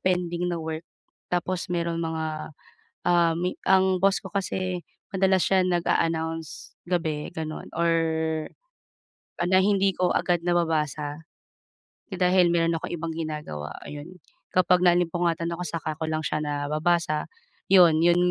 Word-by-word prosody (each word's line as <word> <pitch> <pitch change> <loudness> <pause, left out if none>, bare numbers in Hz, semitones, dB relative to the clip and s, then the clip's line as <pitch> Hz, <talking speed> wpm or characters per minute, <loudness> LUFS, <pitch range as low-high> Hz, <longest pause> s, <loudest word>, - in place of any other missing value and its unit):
pending 180 -1 0
na 175 - -1
work. 160 +1 -5 0.4
Tapos 180 0 -2
meron 170 -1 -1
mga, 160 -1 -3 0.6
um, 170 -1 +4
mi 180 +1 -1
ang 190 0 +4
boss 195 0 +3
ko 190 - -8
kasi 185 -2 -2 0.3
madalas 190 0 +3
siya 190 -1 +3
nag-a-announce 165 -2 -1
gabi 165 -4 -2
gano'n, 155 -1 -6
or 170 0 +1 1.5
ah, 175 - +1
na 185 - +5
hindi 195 -2 +2
ko 180 - +2
agad 175 -1 0
nababasa 155 -3 -1 0.8
dahil 180 -2 +3
meron 165 0 +2
akong 160 - -5
ibang 165 0 -4
ginagawa 150 - -5
ayon. 145 +1 -8 0.5
Kapag 185 0 +4
naalimpungatan 175 -1 +2
ako, 170 +1 -4
saka 155 -2 -4
ko 160 - -2
lang 155 0 -2
siya 155 - -1
nababasa. 155 +2 0 0.4
'Yon, 175 -5 +6
'yon, 175 +2 +4
170 Hz, 130 wpm, -26 LUFS, 160-180 Hz, 1.5 s, Yon